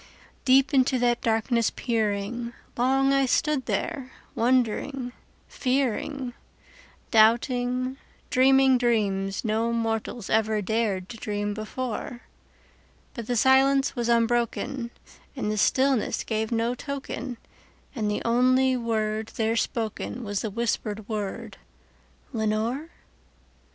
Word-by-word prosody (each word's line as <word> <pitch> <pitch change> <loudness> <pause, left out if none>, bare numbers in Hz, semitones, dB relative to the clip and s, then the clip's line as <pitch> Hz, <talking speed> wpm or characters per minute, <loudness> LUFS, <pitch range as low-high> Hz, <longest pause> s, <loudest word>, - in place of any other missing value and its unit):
Deep 270 +2 +5
into 260 -1 +3
that 240 -1 +1
darkness 230 +1 +1
peering, 230 +1 -2 0.2
long 270 +2 +3
I 275 -1 +3
stood 295 0 +1
there 260 -2 -2 0.2
wondering, 250 +2 0 0.4
fearing, 260 0 -1 0.8
Doubting, 245 +3 +3 0.3
dreaming 265 0 +5
dreams 200 -4 0
no 225 +2 +1
mortals 225 -1 -2
ever 220 -1 +2
dared 205 -2 -1
to 230 - -8
dream 205 -1 -2
before; 240 +3 -5 0.9
But 235 -4 -7
the 245 - 0
silence 270 +3 +4
was 240 -2 -1
unbroken, 235 +2 +1 0.5
and 215 -6 -2
the - - -1
stillness 260 +2 +2
gave 220 0 -2
no 230 +1 +1
token, 270 -2 -5 0.6
And 215 -6 -1
the 210 - -2
only 255 +2 +3
word 220 -2 -1
there 225 0 +1
spoken 230 +1 -2
was 205 -2 -2
the 220 - -2
whispered 215 -1 -2
word, 210 -3 -4 0.8
"Lenore?" 225 +7 -1
235 Hz, 110 wpm, -26 LUFS, 220-255 Hz, 0.9 s, Deep